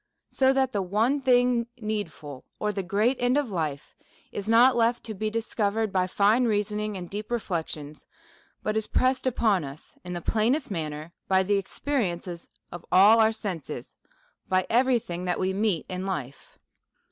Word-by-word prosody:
So 265 Hz, 0 st, +3 dB
that 265 Hz, -1 st, +1 dB
the 205 Hz, -, -1 dB
one 220 Hz, +10 st, +1 dB
thing 245 Hz, -2 st, +3 dB
needful, 170 Hz, -, -5 dB
or 210 Hz, -, -1 dB
the 195 Hz, -, -2 dB
great 210 Hz, +8 st, +1 dB
end 245 Hz, +2 st, +2 dB
of 280 Hz, -7 st, -1 dB
life, 155 Hz, -6 st, -3 dB, 0.4 s
is 205 Hz, +1 st, -5 dB
not 240 Hz, +3 st, +6 dB
left 235 Hz, 0 st, +2 dB
to 220 Hz, -, -5 dB
be 215 Hz, +2 st, -2 dB
discovered 220 Hz, -1 st, -1 dB
by 185 Hz, -1 st, +2 dB
tine 210 Hz, +6 st, +3 dB
reasoning 210 Hz, -1 st, -1 dB
and 180 Hz, -1 st, -7 dB
deep 210 Hz, +4 st, -6 dB
reflections, 160 Hz, -9 st, -4 dB, 0.6 s
but 215 Hz, -, -1 dB
is 220 Hz, -1 st, -1 dB
pressed 260 Hz, 0 st, +1 dB
upon 220 Hz, -7 st, +2 dB
us 140 Hz, +2 st, -10 dB
in 180 Hz, 0 st, -6 dB
the 175 Hz, -, -3 dB
plainest 230 Hz, -, 0 dB
manner 155 Hz, -1 st, -4 dB
by 190 Hz, 0 st, +3 dB
the 200 Hz, +1 st, +2 dB
experience 195 Hz, -3 st, -2 dB
of 175 Hz, 0 st, -10 dB
all 205 Hz, +5 st, +7 dB
our 220 Hz, 0 st, +5 dB
senses,, 195 Hz, -8 st, -6 dB, 0.5 s
by 185 Hz, 0 st, +2 dB
every 250 Hz, +2 st, +4 dB
thing 180 Hz, -5 st, -5 dB
that 180 Hz, -, -1 dB
we 190 Hz, 0 st, 0 dB
meet 200 Hz, -5 st, 0 dB
in 185 Hz, 0 st, -4 dB
life. 150 Hz, -9 st, -6 dB
210 Hz, 170 wpm, -26 LUFS, 180-230 Hz, 0.6 s, all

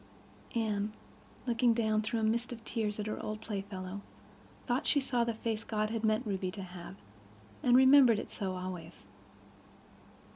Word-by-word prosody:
Anne, 215 Hz, -2 st, 0 dB, 0.5 s
looking 235 Hz, -1 st, +3 dB
down 215 Hz, -2 st, +2 dB
through 225 Hz, +2 st, -1 dB
a -, -, -1 dB
mist 230 Hz, +3 st, +1 dB
of 230 Hz, -2 st, -8 dB
tears, 215 Hz, -2 st, -1 dB
at 210 Hz, -, -2 dB
her 215 Hz, -, -3 dB
old 215 Hz, 0 st, -4 dB
playfellow, 195 Hz, -2 st, -5 dB, 0.6 s
thought 250 Hz, +4 st, 0 dB
she 290 Hz, -, +4 dB
saw 250 Hz, -3 st, +1 dB
the 235 Hz, -, 0 dB
face 225 Hz, 0 st, -2 dB
God 215 Hz, -1 st, -1 dB
had 225 Hz, -1 st, -2 dB
meant 220 Hz, +3 st, +2 dB
Ruby 190 Hz, -3 st, -1 dB
to 195 Hz, +1 st, -6 dB
have, 180 Hz, 0 st, -9 dB, 0.7 s
and 245 Hz, 0 st, +5 dB
remembered 260 Hz, -3 st, +7 dB
it -, -, -5 dB
so 190 Hz, -3 st, -3 dB
always. 180 Hz, -, -7 dB
215 Hz, 160 wpm, -32 LUFS, 200-235 Hz, 0.7 s, remembered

